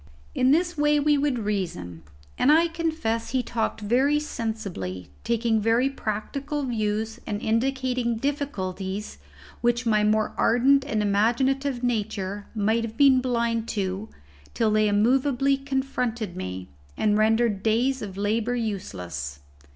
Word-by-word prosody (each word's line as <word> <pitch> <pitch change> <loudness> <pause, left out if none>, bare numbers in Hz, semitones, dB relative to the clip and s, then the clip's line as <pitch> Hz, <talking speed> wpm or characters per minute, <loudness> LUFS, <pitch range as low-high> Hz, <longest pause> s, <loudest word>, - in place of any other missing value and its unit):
In 255 0 +2
this 335 +2 +2
way 295 0 +4
we 295 +1 +3
would 280 -2 +1
reason, 180 - -3 0.3
and 280 - +4
I 330 +2 +5
confess 320 -9 -2
he 260 -1 0
talked 225 -2 -2
very 260 +8 +2
sensibly, 195 - -5
taking 230 -1 +1
very 230 +5 +2
practical 275 +6 -3
views, 220 -2 -2
and 205 -2 -2
indicating 250 +1 0
difficulties 205 - -3 0.4
which 240 +1 +1
my 215 -2 +3
more 215 0 +2
ardent 265 +4 +4
and 220 -7 0
imaginative 245 +6 +1
nature 205 -4 -2
might 220 +2 +1
have 225 0 -6
been 270 -2 +6
blind 235 -2 0
to 195 +2 -2 0.5
till 225 -2 +2
they 215 0 +3
immovably 260 +6 +2
confronted 265 -7 -2
me, 95 0 -6 0.3
and 210 -1 +2
rendered 220 -1 +2
days 240 +5 +1
of 195 -2 -6
labour 220 +4 0
useless. 90 - -4
230 Hz, 130 wpm, -25 LUFS, 210-265 Hz, 0.5 s, been